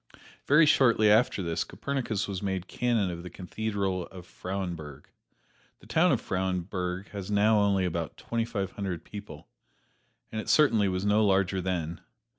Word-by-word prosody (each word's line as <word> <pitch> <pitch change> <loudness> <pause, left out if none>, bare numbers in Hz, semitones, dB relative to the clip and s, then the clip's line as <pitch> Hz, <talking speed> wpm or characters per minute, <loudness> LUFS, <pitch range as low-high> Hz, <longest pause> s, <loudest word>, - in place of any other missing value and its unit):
Very 150 +3 +6
shortly 115 -7 +5
after 110 -3 +3
this 85 -1 -1
Copernicus 120 -7 -3
was 95 -2 -4
made 95 -2 -2
Canon 115 -6 0
of 85 0 -6
the 90 - -8
Cathedral 95 0 -3
at 90 -1 -10
Frauenburg. 85 -7 -6 0.7
The - - -19
town - - +3
of - - +2
Frauenburg 90 0 -3
has 100 -1 -7
now 105 +1 +4
only 100 -2 +2
about 85 -2 -3
twenty 115 -1 -2
five 100 -4 -3
hundred 100 -7 -4
people, 100 -8 -10 0.8
and 110 - -3
it - - -8
certainly 115 -10 +4
was 95 +1 -1
no 105 +1 +4
larger 95 -1 +2
then. 85 -3 -3
95 Hz, 155 wpm, -28 LUFS, 90-110 Hz, 0.8 s, Very